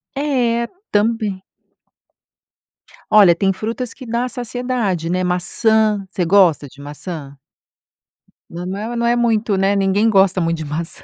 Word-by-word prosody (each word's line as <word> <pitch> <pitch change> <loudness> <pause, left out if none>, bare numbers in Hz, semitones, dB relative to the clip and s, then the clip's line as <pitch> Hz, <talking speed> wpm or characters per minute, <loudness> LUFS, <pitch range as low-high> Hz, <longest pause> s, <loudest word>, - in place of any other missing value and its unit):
É, 245 -5 0 0.2
também. 210 -2 0 1.7
Olha, 200 -5 +6
tem 195 +2 +1
frutas 225 +5 -4
que 260 - -11
dá 235 +1 -1
a - - -4
saciedade, 240 -8 -3
né. 185 +1 0
Maçã, 210 +3 +1
você 180 -2 -2
gosta 170 -5 +3
de 140 +1 -15
maçã? 145 0 -8 1.1
Não, 175 +1 -7
não 190 +2 -4
é, 225 +3 -4
não 235 0 -1
é 240 - +3
muito, 225 -3 +1
né. 195 +1 +1
Ninguém 200 +3 +2
gosta 190 -2 +3
muito 165 0 0
de 160 - -6
maçã. 160 +3 -5
200 Hz, 145 wpm, -18 LUFS, 180-230 Hz, 1.7 s, Olha